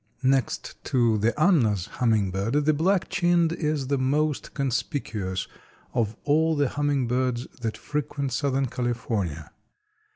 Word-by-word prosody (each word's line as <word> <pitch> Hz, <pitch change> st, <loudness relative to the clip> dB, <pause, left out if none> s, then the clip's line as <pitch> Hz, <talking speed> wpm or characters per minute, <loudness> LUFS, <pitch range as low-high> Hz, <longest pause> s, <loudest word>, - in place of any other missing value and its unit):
Next 130 Hz, -3 st, 0 dB
to 115 Hz, -4 st, +2 dB
the 115 Hz, +7 st, +1 dB
Anna's 120 Hz, -, +3 dB
hummingbird, 110 Hz, +3 st, 0 dB
the 155 Hz, -, +4 dB
Black 185 Hz, +5 st, +2 dB
chinned 175 Hz, -2 st, +2 dB
is 150 Hz, -4 st, -1 dB
the 140 Hz, +1 st, 0 dB
most 145 Hz, +3 st, 0 dB
conspicuous 115 Hz, -, -2 dB, 0.5 s
of 110 Hz, -2 st, 0 dB
all 160 Hz, +2 st, +3 dB
the 145 Hz, -3 st, +2 dB
hummingbirds 130 Hz, -4 st, 0 dB, 0.2 s
that 110 Hz, -2 st, -2 dB
frequent 145 Hz, -3 st, -3 dB
southern 135 Hz, 0 st, +1 dB
California. 115 Hz, -, -3 dB
130 Hz, 120 wpm, -26 LUFS, 115-150 Hz, 0.5 s, the